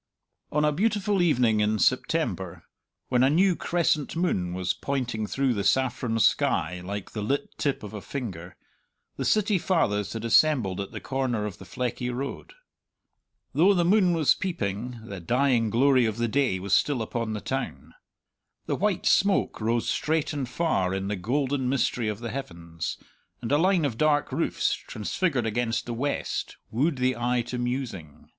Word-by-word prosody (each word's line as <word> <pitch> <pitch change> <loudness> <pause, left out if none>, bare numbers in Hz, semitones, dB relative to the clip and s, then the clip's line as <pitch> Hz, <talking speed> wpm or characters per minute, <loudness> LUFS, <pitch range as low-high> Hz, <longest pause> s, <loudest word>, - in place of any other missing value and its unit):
On 150 +1 +2
a 150 - +3
beautiful 205 +2 +1
evening 125 -10 +3
in 105 +1 +2
September, - - 0 0.5
when 125 -1 +3
a 130 - +5
new 180 +4 +4
crescent 165 -5 0
moon 95 - 0
was 90 -1 0
pointing 125 -6 -2
through 135 +3 +1
the 100 -3 -2
saffron 125 -2 +1
sky 90 -5 +2
like 100 +1 -5
the 105 - -4
lit 140 +7 -2
tip 140 -5 -1
of 105 - -8
a 105 - -6
finger, 95 -11 -6 0.6
the - - -2
City 210 -2 +2
Fathers 105 - 0
had 115 0 -4
assembled 115 -7 +3
at 100 - -5
the - - -7
corner 130 -5 -1
of 105 -4 -6
the 95 - -10
Fleckie 125 +5 -3
Road. 135 +3 -5 1.0
Though 190 +6 +5
the 175 -1 +2
moon 185 -1 +4
was 155 -5 +4
peeping, 120 - -3
the 100 -4 -7
dying 120 +4 +2
glory 130 +1 +4
of 110 0 -3
the 120 0 0
day 125 -4 +1
was 95 +1 -3
still 130 -1 +2
upon 115 0 -3
the 105 - -3
town. - - -4 0.7
The - - -1
white 205 -2 0
smoke 195 - +2
rose 115 +2 0
straight 155 -1 0
and 135 -4 -3
far 95 - 0
in 95 +1 -3
the 105 - -1
golden 130 +6 -1
mystery 125 -3 0
of 105 +1 -3
the 115 -2 -4
heavens, 85 -10 -5 0.4
and 120 0 -5
a 145 - +5
line 180 -2 +3
of 120 -5 -3
dark 150 -2 +2
roofs, 155 +6 0
transfigured 130 - -2
against 115 +1 -1
the 120 - -4
west, 140 +5 -3
wooed 140 +8 +1
the 130 0 +1
eye 120 +1 0
to 125 +1 -5
musing. 120 - -4
125 Hz, 170 wpm, -26 LUFS, 105-145 Hz, 1.0 s, a